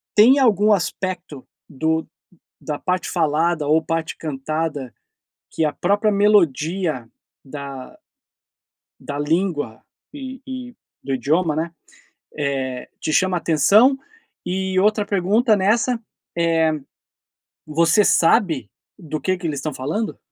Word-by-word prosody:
tem 245 +7 +7
algum 215 -5 +4
aspecto 180 -5 -3 0.2
do 160 +2 -1 0.6
da 150 -2 -4
parte 180 0 -2
falada, 160 -1 +1
ou 155 +2 +3
parte 165 0 -2
cantada, 150 -2 -3 0.6
que 160 - 0
a 150 - +1
própria 205 +4 +1
melodia 175 - +2 0.4
da 140 - -8 1.0
da 145 -1 -6
língua 145 - -1 0.3
e 265 -3 -8
e 255 -2 -7 0.3
do 135 - -2
idioma 155 +6 +1
né, 160 +2 -2 0.6
eh, 135 -3 -3
te 155 - -3
chama 185 +3 +2
atenção? 200 - +4 0.5
E 190 +1 0
outra 210 +1 +2
pergunta 205 +4 +2
nessa 230 +5 +1 0.4
é: 165 -1 +2 1.0
você 165 +6 +3
sabe 160 - +3 0.3
do 155 -5 -5
que 185 +6 0
que 180 - -9
eles 145 -3 -2
estão 155 - -4
falando? 160 +12 -3
165 Hz, 115 wpm, -21 LUFS, 150-200 Hz, 1.0 s, tem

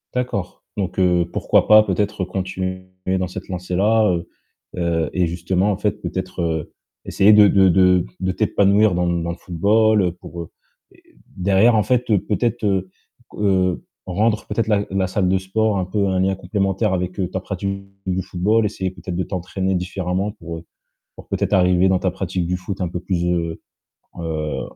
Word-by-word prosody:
D'accord, 120 -7 -3
donc 95 -1 -2
heu, 90 -2 +3
pourquoi - - +2
pas, 110 0 +8
peut-être, 105 -2 -1
continuer 95 0 -4 0.3
dans 90 - -1
cette 90 - -8
lancée-là, 95 +4 +1
heu 85 0 -4 0.5
heu 85 -3 0
et 90 -1 +1
justement, 90 +4 0
en 95 - -1
fait, 105 0 -2
peut-être, 95 -1 -4
heu, 80 -2 -2 0.3
essayer 100 +2 +4
de 105 -1 +8
de 95 -1 +5
de 90 0 +4
de 95 0 0
t'épanouir 100 0 +3
dans 90 0 0
dans 85 -1 -1
le - - -5
football, 105 +4 +2
heu, 90 - +1
pour, 85 0 -9
heu, 80 - -13 0.9
derrière, 100 +5 +3
en 110 - +4
fait, 125 +4 +1 0.2
peut-être, 115 +1 -1
heu 95 -2 0 0.5
heu, 95 -3 +1 0.2
rendre, 105 +4 0
peut-être, 115 -2 -1
la 105 -2 +2
la 95 -1 0
salle 95 0 0
de 95 - +3
sport 105 +2 0
un 90 - -1
peu 100 +1 0
un 95 -1 0
lien 95 +1 +1
complémentaire 95 +2 -1
avec, 90 +1 -3
heu, 90 - 0
ta 95 - -2
pratique 100 +1 -4 0.2
du 95 0 -1
football, 105 +6 +1
essayer 95 -3 -3
peut-être 90 0 -7
de 90 - 0
t'entraîner 95 +1 -3
différemment 90 +2 -2
pour, 85 -5 -8
heu, 85 - -16 0.5
pour - - -13
peut-être - - -1
arriver 90 -1 +4
dans 95 -1 +3
ta 95 - 0
pratique 90 -1 -3
du 90 +1 -1
foot 95 +1 -6
un 90 - 0
peu 90 +1 -5
plus, 90 -2 -1
heu 85 -2 -1 0.6
heu, 80 -2 -3
95 Hz, 180 wpm, -21 LUFS, 90-100 Hz, 0.9 s, pas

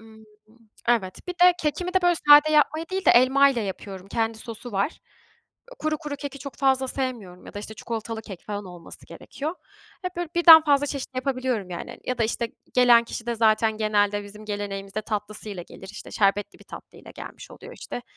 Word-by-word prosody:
Imm, 220 0 -16 0.6
evet, 200 -6 +1
bir - - -1
de 360 0 +6
kekimi 355 +4 -2
de, 375 - +3
böyle, 350 0 +4
sade 295 +1 +9
yapmayı 310 +2 +2
değil 380 0 -2
de - - +6
elmayla 265 0 +5
yapıyorum, 195 -1 -7
kendi 225 0 -1
sosu 230 +1 -9
var. 200 +9 +1 0.8
Eee, - - -11
kuru 310 0 -1
kuru 295 -2 -6
keki 280 -1 -7
çok 280 +1 -9
fazla 265 -1 +2
sevmiyorum 230 -10 -5
ya - - -12
da, - - -5
işte, 215 +1 -8
çikolatalı 225 0 -5
kek 190 -5 -10
falan 205 -1 -4
olması 175 -2 -12
gerekiyor. 305 +4 -6 0.5
Hep 365 -1 -5
böyle 350 -2 -3
birden 330 -2 +10
fazla 290 -1 +3
çeşit 275 -2 -5
yapabiliyorum 255 -7 -2
yani 170 - -6
hani. - - -12
Ya 255 - -3
da, 230 - +2
işte, 235 +1 -2 0.3
gelen 245 -2 +6
kişi 230 0 -7
de 235 - -1
zaten 220 0 +2
genelde 205 -1 +1
bizim 210 +1 -12
geleneğimizde 205 0 -4
tatlısıyla 210 -2 -5
gelir. 190 +2 -13
İşte, - - -10
şerbetli 200 0 0
bir - - -17
tatlıyla - - -12
gelmiş - - -10
oluyor, - - -12
işte 245 - -7
235 Hz, 190 wpm, -25 LUFS, 205-280 Hz, 0.8 s, birden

